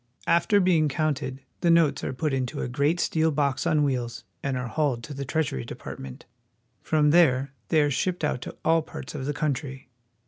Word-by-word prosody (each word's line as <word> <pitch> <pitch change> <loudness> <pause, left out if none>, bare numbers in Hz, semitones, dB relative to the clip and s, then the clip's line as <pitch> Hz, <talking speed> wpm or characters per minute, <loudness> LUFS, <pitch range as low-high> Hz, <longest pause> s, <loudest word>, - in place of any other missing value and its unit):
After 185 +4 +3
being 170 -5 +3
counted, 140 -2 -2 0.2
the 170 - +2
notes 165 -3 +4
are - - -2
put 145 +2 -2
into 130 -2 -2
a - - -2
great 145 +7 +1
steel 160 -1 +2
box 140 -4 0
on 150 -1 +3
wheels 120 -4 -2 0.2
and 135 -2 -1
are 125 - -3
hauled 135 -4 -1
to 150 - -7
the 140 0 -5
Treasury 135 - -1
Departments 65 +2 -8 0.6
From 150 -2 +2
there 140 -5 +4 0.2
they 155 -3 +4
are 145 - +1
shipped 180 +6 -1
to 150 -4 -3
all 165 0 +4
parts 155 -3 -8
of 135 -3 -4
the 145 - 0
country. 135 -3 -3
145 Hz, 185 wpm, -26 LUFS, 130-160 Hz, 0.6 s, notes